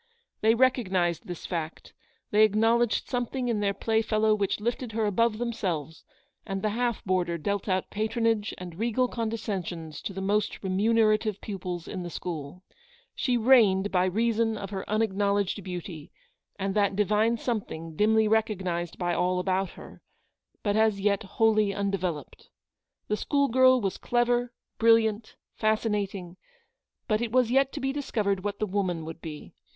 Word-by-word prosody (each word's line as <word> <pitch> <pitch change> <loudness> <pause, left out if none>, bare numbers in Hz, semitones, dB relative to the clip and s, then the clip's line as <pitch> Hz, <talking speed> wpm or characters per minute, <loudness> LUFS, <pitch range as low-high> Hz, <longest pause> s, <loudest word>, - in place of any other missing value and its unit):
They 220 +1 +4
recognised 190 - +1
this 175 -2 -7
fact, 165 -2 -5 0.4
they 210 - +4
ac 215 -1 +5
knowledged 230 +1 +2
something 245 0 -2
in 225 -3 0
their 200 -1 0
playfellow 220 0 +1
which 200 -1 0
lifted 235 +1 -3
her 220 0 0
above 215 +2 +2
themselves, 180 - -3 0.4
and 195 0 -4
the 215 - +1
half 240 0 -1
boarder 180 -3 0
dealt 200 +5 -2
out 185 0 -1
patronage 220 0 0
and 180 -1 -9
regal 240 +3 +1
condescensions 195 -9 -4
to - - -4
the 195 - -6
most 205 +3 -1
remunerative 215 +1 +2
pupils 180 -4 -5
in 185 - -5
the 175 - -5
school. 165 0 -6 0.5
She 250 -2 0
reigued 215 -5 +4
by 180 -1 +3
reason 225 +3 +1
of 200 -1 -6
her 190 -1 -5
unacknowledged 205 -2 0
beauty, 175 -4 -7 0.5
and 195 0 -2
that 200 -1 +2
divine 215 +3 +2
something, 165 -10 -4
dimly 220 +3 +3
recognised 185 -6 -1
by 175 -1 -1
all 180 +1 +1
about 185 +1 0
her, - - -12 0.6
but 205 -1 +1
as 220 -2 +3
yet 200 0 +1
wholly 215 0 +2
undeveloped. 185 -7 -3 0.6
The 210 - 0
school 280 +3 +1
girl 255 +1 +5
was 195 -5 -2
clever, 240 0 +1 0.3
brilliant, 225 -1 +3 0.2
fascinating, 205 -5 -1 0.7
but 215 -2 +1
it 235 -2 -2
was 250 -1 +3
yet 270 +1 +3
to 295 - -4
be 270 0 -1
discovered 210 -9 -1
what 205 -1 -3
the 215 - -1
woman 185 -5 -2
would 165 0 -8
be. 155 -3 -8
210 Hz, 155 wpm, -27 LUFS, 185-225 Hz, 0.7 s, ac